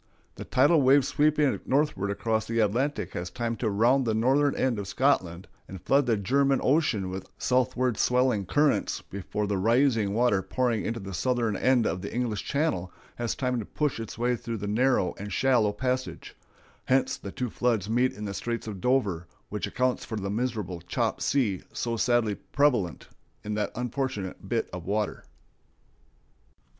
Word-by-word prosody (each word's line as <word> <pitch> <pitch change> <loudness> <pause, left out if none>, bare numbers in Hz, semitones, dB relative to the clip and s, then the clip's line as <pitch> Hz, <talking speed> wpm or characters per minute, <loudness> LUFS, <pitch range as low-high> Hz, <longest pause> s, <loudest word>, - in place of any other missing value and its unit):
The - - -8
tidal 145 +4 +4
wave 135 +1 +5
sweeping 150 0 +2
northward 135 -8 0
across 110 +2 -1
the 115 - -2
Atlantic 120 +7 0
has 90 +1 -4
time 115 +1 -3
to 115 - -1
round 120 +7 +3
the 110 -3 0
northern 135 +5 +2
end 125 -5 0
of 100 - -5
Scotland 95 -9 0 0.2
and 95 - -8
flood 135 +9 +2
the 115 -3 +2
German 135 +7 +2
Ocean 125 - +1
with 95 0 -6
southward 125 -2 +1
swelling 125 -6 +2
currents 145 +4 +1
before 100 +2 -4
the 100 -1 -1
rising 115 -1 +2
water 115 -5 +3
pouring 120 +1 -1
into 115 +1 -3
the 95 -1 -7
southern 120 0 0
end 125 +2 +3
of 95 - -1
the 100 - -6
English 120 -4 -2
Channel 140 - -1 0.3
has 120 -1 -2
time 125 -2 -1
to 110 - -5
push 150 0 -2
its 115 -1 -7
way 120 +1 +1
through 115 -1 -5
that 100 0 -4
narrow 125 -4 +2
and 100 +1 -6
shallow 115 +1 +3
passage; 130 +4 -3 0.5
hence 130 +1 +2
the 100 - -8
two 125 +1 -4
floods 115 -5 0
meet 125 +3 +2
in 105 +2 -7
the 100 - -4
Straits 115 +3 -3
of 100 -4 -6
Dover, 100 -10 +1 0.2
which 105 - -3
accounts 125 0 0
for 110 - -5
the 100 -2 -3
miserable 105 -6 -3
chop 85 - -2
sea 110 -10 +1
so 115 -1 -2
sadly 115 -2 +2
prevalent 120 - 0 0.4
in 105 - -3
that 105 -1 -1
unfortunate 125 -5 -4
bit - - 0
of 90 -1 -6
water. 105 +3 -2
115 Hz, 170 wpm, -27 LUFS, 100-130 Hz, 0.5 s, wave